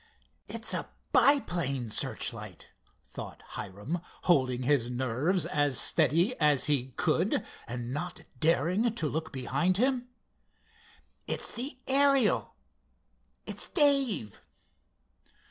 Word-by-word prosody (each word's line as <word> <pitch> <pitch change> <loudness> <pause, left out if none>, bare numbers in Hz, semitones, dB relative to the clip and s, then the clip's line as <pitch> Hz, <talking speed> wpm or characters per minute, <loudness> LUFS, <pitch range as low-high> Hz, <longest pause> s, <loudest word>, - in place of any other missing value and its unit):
"It's - - -3
a - - -2 0.2
biplane 170 - +2
searchlight," - - -3 0.4
thought - - -9
Hiram, 105 - -5 0.2
holding 130 -7 +2
his 125 -3 +2
nerves 130 +9 0
as 145 -3 +1
steady 165 - +3
as 150 -4 +3
he 140 -4 +1
could, - - +1 0.2
and 120 +1 -5
not 175 +3 -4 0.2
daring 175 - +2
to 160 - -1
look 160 +2 -3
behind 175 +7 0
him. 250 +1 +1 1.2
"It's - - -2
the 255 +2 -4
Ariel—it's 275 -3 -1
Dave!" 275 - +2
160 Hz, 95 wpm, -29 LUFS, -, 1.2 s, steady